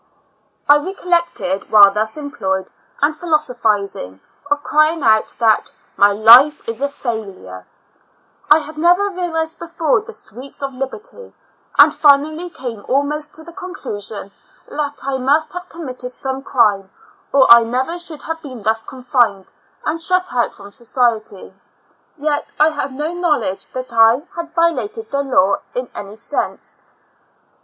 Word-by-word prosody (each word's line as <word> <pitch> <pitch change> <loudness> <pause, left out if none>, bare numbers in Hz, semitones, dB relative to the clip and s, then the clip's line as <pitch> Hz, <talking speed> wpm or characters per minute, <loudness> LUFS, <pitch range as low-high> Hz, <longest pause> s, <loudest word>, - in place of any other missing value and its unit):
I 290 - +7
recollect, 340 - -2
while 205 -2 +8
thus 215 +5 -2
employed 195 -10 -3 0.4
and 295 +2 +3
thus 300 - -23
philosophising, 220 - -1 0.3
of 290 0 0
crying 310 +1 +2
out, 220 -1 +3
that 225 -2 +2
" - - -37
my 200 +1 +5
life 235 +8 +7
is 230 +3 -4
a 280 - +2
failure^ 200 - -6 0.8
I 300 - +8
had 305 0 -7
never 355 +5 +3
realized 325 -3 -3
before 335 +1 0
the 460 - -10
sweets 280 - -10
of 270 -1 -3
liberty, 275 - -7 0.4
and - - +7
finally 310 +4 +3
came 235 -9 -7
almost 290 +2 -1
to 315 - -11
the 340 +1 -12
conclusion 215 - -7 0.4
that 290 -1 -4
I 270 -1 -1
must 295 +4 +1
have 360 +1 -7
committed 255 -6 -7
some 265 0 -4
crime, 205 -8 +1 0.4
or 275 -1 +5
I 235 0 +10
never 255 +9 -2
should 330 -4 -8
have 325 0 -5
been 255 -8 -9
thus 220 +1 +1
confined 240 -7 -1 0.3
and 325 +2 -1
shut 365 +1 0
out 240 -1 0
from 200 -1 -13
society; 230 -4 -2 0.6
yet 295 0 -2
I 305 +1 +6
had 290 -2 -4
no 300 +5 -4
knowledge 290 - -1
that 255 -2 -6
I 230 +6 +4
had 335 -1 -6
violated 370 +7 -1
the 280 - 0
law 200 -8 +2 0.2
in 250 0 -4
any 205 +1 -8
sense. 255 +6 -4
275 Hz, 150 wpm, -18 LUFS, 225-320 Hz, 0.8 s, I